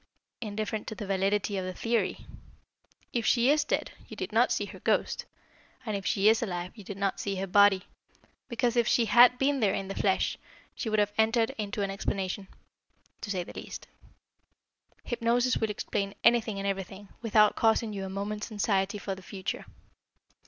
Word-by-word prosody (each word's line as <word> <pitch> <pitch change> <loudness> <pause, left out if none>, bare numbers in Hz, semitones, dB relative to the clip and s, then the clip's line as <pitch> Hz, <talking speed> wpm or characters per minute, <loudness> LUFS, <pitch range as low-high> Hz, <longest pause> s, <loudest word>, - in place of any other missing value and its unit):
"Indifferent 215 0 -3
to 220 - -5
the 210 - -6
validity 195 +1 0
of 185 - -2
the 185 0 -5
theory. 230 0 -1 0.9
If 235 - 0
she 245 +4 +4
is 300 0 +3
dead, - - -1 0.2
you - - -9
did - - -4
not - - +3
see - - 0
her - - -11
ghost, - - 0 0.6
and 215 -3 -2
if 195 -2 -3
she 200 +1 +2
is 225 +1 +5
alive 180 -4 -3
you 210 - -11
did 195 +1 -7
not 195 -1 -1
see 200 -1 -2
her 190 +1 -2
body, 195 0 +5 0.7
because, 235 0 0
if 235 -2 +3
she 235 - +3
had 245 +3 +7
been 275 +2 +1
there 205 -5 +2
in 195 0 -4
the - - -3
flesh, 190 -1 0 0.3
she 230 - -4
would 215 - +1
have 205 0 +2
entered 225 +1 +3
into 205 -1 -3
an 195 - -2
explanation 195 0 -3 0.7
to 210 - -6
say 185 -3 -1
the - - -11
least. - - -8 1.2
Hypnosis 240 +1 +1
will 220 - 0
explain 200 -1 -3
anything 230 -3 +3
and 195 - -4
everything, 195 0 -4
without 215 -2 +4
causing 225 -1 +2
you 195 -1 -4
a 190 - -5
moment's 205 +3 -4
anxiety 200 -1 0
for 200 -1 -4
the 190 - -9
future." 190 0 -5
205 Hz, 185 wpm, -29 LUFS, 195-225 Hz, 1.2 s, had